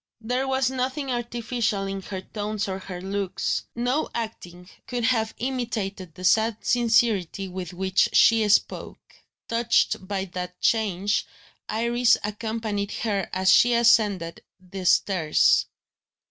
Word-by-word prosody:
There 250 +4 -1
was 265 -1 +1
nothing 265 +2 -2
artificial 235 -3 -2
in 195 0 -4
her 190 0 -6
tones 210 +1 -4
or 190 0 -4
her 185 -2 -7
looks; 195 0 -2
no 245 +6 0
acting 180 -6 -6 0.2
could 245 -1 -3
have 225 -2 +1
imitated 220 -8 -4
the 185 - -10
sad 220 +4 +3
sincerity 225 -6 +1
with 185 -1 -6
which 190 +1 +1
she 220 -2 +5
spoke. 205 - -1 0.3
Touched 230 -4 +1
by 195 -1 -2
that 180 0 -6
change, 205 -2 +1 0.4
Iris 235 +2 +2
accompanied 210 -1 -3
her 200 -5 -2
as 190 0 +3
she 240 0 +5
ascended 210 -8 +2 0.2
the 185 0 -6
stairs. 165 -6 +3
210 Hz, 125 wpm, -25 LUFS, 190-235 Hz, 0.4 s, she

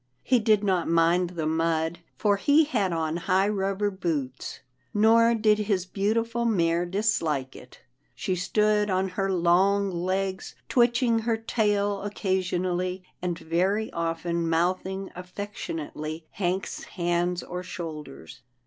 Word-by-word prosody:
He 250 - +3
did 215 -2 +3
not 185 -5 +1
mind 170 +2 +3
the 170 -3 -4
mud, 160 +1 0 0.2
for 205 -2 +2
he 290 +9 +4
had 220 - 0
on 160 -1 -1
high 190 +3 +2
rubber 200 0 0
boots, 155 -9 -3 0.3
nor 230 +2 +5
did 215 -1 +3
his 200 -4 0
beautiful 225 +5 0
mare 175 -6 +1
dislike 165 -9 0
it. 125 - -14 0.3
She 185 - -2
stood 210 +3 +2
on 190 0 +1
her 195 +1 -1
long 190 +3 +3
legs, 185 +2 -2
twitching 240 -1 +3
her 225 0 0
tail 205 -3 0
occasionally, 185 -2 -1 0.2
and 175 -2 -2
very 190 +7 0
often 170 0 -1
mouthing 185 +3 -1
affectionately 165 -4 -6
Hank's 190 0 -2
hands 175 0 -1
or 180 0 -5
shoulders. 155 - -8
185 Hz, 125 wpm, -26 LUFS, 170-205 Hz, 0.3 s, nor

